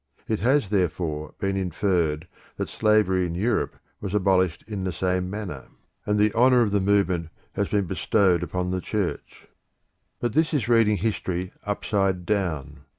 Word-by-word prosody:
It 110 - 0
has, 130 -2 +2
therefore, 80 -5 -1
been 95 0 -1
inferred 90 -4 0 0.3
that - - -3
slavery 105 -4 +2
in 85 - -5
Europe 105 +4 0 0.2
was 100 0 -4
abolished 95 -3 +2
in 105 -3 -4
the 95 - -1
same 90 0 -1
manner, 95 -9 -6 0.4
and 105 0 +2
the 105 0 +3
honour 125 +1 +5
of 105 - -1
the 100 - +2
movement 95 -4 +1 0.2
has 100 - -1
been 100 -2 0
bestowed 95 0 +2
upon 90 +1 -2
the 95 0 -1
Church. 105 -3 -4 0.7
But 120 -2 -1
this 155 +1 +2
is 120 -7 0
reading 115 -3 +4
history 95 -2 -2 0.2
upside 95 -3 0
down. 80 -8 -2
95 Hz, 155 wpm, -25 LUFS, 90-105 Hz, 0.7 s, honour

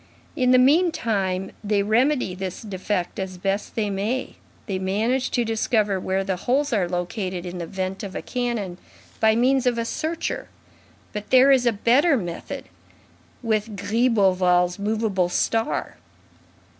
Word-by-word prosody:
In 255 -4 +2
the 255 - +6
meantime, 230 - +2
they 205 -1 +1
remedy 245 0 +2
this 185 +1 -5
defect 190 -3 -3
as 190 -1 -4
best 195 +3 -2
they 210 -3 0
may; 210 +7 -2 0.3
they 195 -4 -3
manage 220 +8 0
to 240 -2 0
discover 215 -3 +1
where 190 +1 -1
the 190 -1 -2
holes 265 +7 0
are 190 -5 +1
located 180 0 -3
in 180 0 -6
the 170 - -4
vent 190 0 -4
of 195 -2 -7
a - - -3
cannon, 235 -8 -3 0.4
by 220 0 +4
means 255 +2 +2
of 240 -1 +2
a 230 - -1
searcher. 320 +7 -3 0.7
But 210 0 -6
there 260 +2 +6
is 255 -3 +4
a - - +5
better 255 +8 +3
method, 175 -6 -5 0.8
with 215 -1 -1
Gribeauval's 190 -5 +2
movable 205 -3 0
star." 225 +5 -1
210 Hz, 145 wpm, -23 LUFS, 190-245 Hz, 0.8 s, the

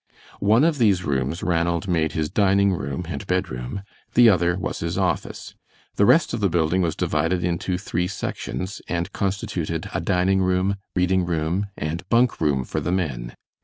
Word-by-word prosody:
One 110 +6 +4
of 160 -3 +2
these 100 -6 +3
rooms 70 +3 -1
Ranald 85 +1 0
made 80 -4 +1
his 80 -1 -1
dining 100 +1 +3
room 70 +1 -4
and 95 +3 -5
bedroom, 90 -2 -2 0.3
the 120 -1 +8
other 85 -3 +2
was - - -4
his 85 +2 -3
office. 90 -5 -2 0.4
The 100 - +3
rest 165 - +4
of - - -1
the 100 -2 +2
building 85 +2 +1
was 85 -3 0
divided 85 +4 0
into 90 +1 -1
three 90 -2 -2
sections, 95 -1 -5
and 85 -1 -2
constituted 95 -5 -3
a - - -1
dining 95 +2 +2
room, 95 +2 +1 0.2
reading 90 0 +2
room, 85 +3 -1
and 75 +3 -3
bunk 120 -3 +2
room 70 -4 +2
for - - -3
the - - -2
men. 70 -10 -2
90 Hz, 170 wpm, -23 LUFS, 80-100 Hz, 0.4 s, the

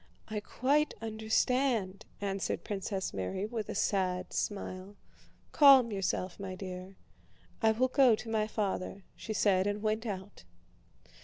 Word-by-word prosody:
"I 215 -1 -2
quite 280 +8 +1
understand," 220 -1 0
answered 195 -1 -2
Princess 195 -1 -3
Mary, 95 - -3
with 220 -1 -4
a - - -4
sad 185 -2 0
smile. 195 -1 -4 0.6
"Calm 270 -5 +7
yourself, 190 -2 -2
my 190 -2 -5
dear. 185 0 -7 0.7
I 220 -1 +5
will 255 +4 +2
go 255 -3 +5
to 225 - -9
my 220 -1 0
father," 200 -2 -3
she 220 - -5
said, 195 -2 +3
and 205 +1 -2
went 220 +2 0
out. 195 -1 -6
205 Hz, 135 wpm, -31 LUFS, 190-225 Hz, 0.7 s, Calm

